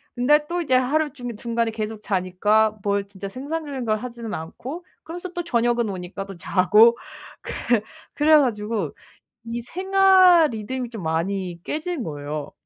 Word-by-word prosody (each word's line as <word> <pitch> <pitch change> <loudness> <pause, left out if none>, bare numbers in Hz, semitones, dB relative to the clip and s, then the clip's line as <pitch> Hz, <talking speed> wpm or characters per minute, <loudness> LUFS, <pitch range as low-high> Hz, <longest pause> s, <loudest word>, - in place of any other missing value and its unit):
근데 285 +5 +4
또 350 +2 -2
이제 280 -6 -1
하루 285 +3 +1
중에 245 -4 -6
중간에 235 0 -1
계속 215 -1 -5
자니까 205 +3 +1
뭘 200 -1 0
진짜 195 0 -8
생산적인 280 0 -5
걸 215 -1 +1
하지는 235 -1 -7
않고 255 - -6 0.2
그러면서 350 +2 -7
또 350 0 -3
저녁은 235 -5 +1
오니까 190 +1 -6
또 195 -2 -10
자고 210 +7 +5 0.4
그 - - -7 0.6
그래 310 +1 +5
가지고 210 - 0 0.5
이 235 +1 -4
생활 370 0 +5
리듬이 240 +2 -4
좀 220 -6 -7
많이 175 +2 -2
깨진 315 -2 -3
거예요. 145 -2 -5
230 Hz, 305 characters per minute, -23 LUFS, 200-295 Hz, 0.6 s, 자고